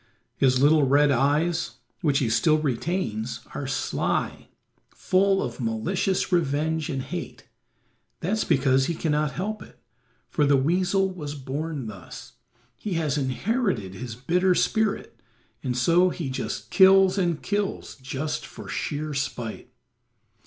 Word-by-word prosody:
His 130 -1 +3
little 145 +1 +5
red 145 +2 +4
eyes, 150 +6 +1 0.3
which 145 -6 +2
he 135 -5 +1
still 155 +7 +4
retains, 130 - -2
are 140 - -4
sly, 135 +1 -2 0.4
full 195 +1 +2
of 125 -1 -5
malicious 175 - -1
revenge 160 -1 0
and 135 -4 -2
hate; - - -7 0.7
that's 210 +6 0
because 135 0 +3
he 170 - -1
cannot 150 -2 0
help 210 +4 -3
it, - - -14 0.5
for 150 - 0
the 140 -1 +4
weasel 185 +6 +1
was 150 -5 -6
born 145 +1 -4
thus. 100 -5 -10 0.4
He 205 - -4
has 155 -4 0
inherited 145 - -1
his 115 +3 -6
bitter 180 +9 +2
spirit, 220 +1 0 0.4
and 125 -1 -2
so 170 +8 +4
he 165 -7 -4
just 130 - -4
kills 190 0 +6
and 170 -4 +1
kills, 205 -1 -2
just 135 +3 -4
for - - -10
sheer 150 +1 -3
spite. 125 -5 -4
150 Hz, 130 wpm, -25 LUFS, 135-180 Hz, 0.7 s, kills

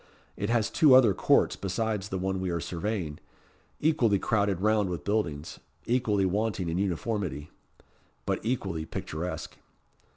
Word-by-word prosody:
It 100 - -3
has 115 -2 +1
two 150 -6 +6
other 120 -6 +6
courts - - +3
besides 100 +1 -2
the 95 - -2
one 95 +1 -1
we 95 - -1
are 85 -1 -1
surveying; 85 -2 -3 0.6
equally 125 -10 +3
crowded 100 -3 +1
round 105 -1 +2
with 85 -5 -4
buildings, 85 -8 -2 0.3
equally 110 -5 +1
wanting 100 -2 -1
in 85 +2 -1
uniformity, 90 - -2 0.7
but - - 0
equally 100 -9 -2
picturesque. 85 +4 -5
100 Hz, 135 wpm, -28 LUFS, 90-110 Hz, 0.7 s, two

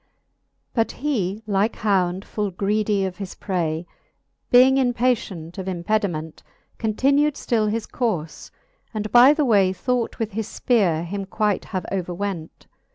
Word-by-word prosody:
VII. - - -47 0.2
But 225 -2 +1
he, 220 -8 -2
like 205 +1 +1
hound 190 -3 0
full 210 -2 -2
greedy 200 +1 0
of 185 -1 -5
his 195 -3 -7
pray, 170 -4 -2 0.6
Being 255 +2 +6
impatient 235 -9 -1
of 190 - -5
impediment, 175 -3 -2 0.4
Continu'd 275 +7 +2
ftill 220 -3 0
his 225 +1 -2
courfe, 180 -11 -3 0.5
and 215 0 -3
by 245 +3 +8
the 300 -2 +1
way 200 -6 +4
Thought 245 +4 -2
with 225 -1 -2
his 220 +1 -3
fpeare 180 -9 +2
him 195 +3 -4
quight 210 0 0
have 185 -3 -4
overwent. 180 -2 -4
205 Hz, 140 wpm, -23 LUFS, 185-230 Hz, 0.6 s, by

